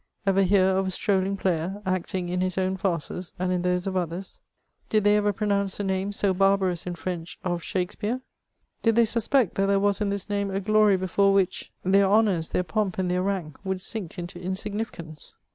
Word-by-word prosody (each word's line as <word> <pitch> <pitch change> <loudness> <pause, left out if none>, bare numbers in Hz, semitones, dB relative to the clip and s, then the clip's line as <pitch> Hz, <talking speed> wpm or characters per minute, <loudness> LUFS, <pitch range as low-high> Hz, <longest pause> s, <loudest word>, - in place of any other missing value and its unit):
ever 195 0 +3
hear 190 0 +4
of 190 0 +2
a - - 0
strolling 195 +1 0
player, 185 +1 -1
acting 185 -1 -2
in 180 +1 -1
his 185 0 -1
own 190 0 +1
&rces 180 -1 -3
and 185 0 -1
in 180 -1 0
those 180 0 0
of 190 -1 -2
others? 180 +1 -4 0.5
Did 215 -1 +2
they 205 0 +5
ever 210 0 +2
pronounce 200 -1 0
the 205 - -2
name, 190 +1 -1
so 200 -1 +1
barbarous 190 -2 +2
in 175 - -3
French, 170 +1 -5
of 175 -1 -1
Shakspeare? 210 +7 -2 0.6
Did 225 -1 +3
they 235 0 +5
sus 230 0 +1
Eect 265 -9 +3
that 195 0 +1
there 200 0 +3
was 200 +1 +2
in 205 - +1
this 200 -1 -3
name 200 -1 -1
a 195 0 -1
glory 210 0 +4
before 195 +2 +2
which 195 -2 0
their 195 +1 +4
onours, 200 -5 +3
their 180 - 0
pomp, 190 +2 -1
and 185 -1 0
their 180 0 +1
rank, 185 -6 -3
would 190 -1 -2
sink 195 -2 -3
into 175 0 -6
insignifi 205 +4 -3
cance 155 -2 -9
190 Hz, 210 wpm, -26 LUFS, 180-200 Hz, 0.6 s, they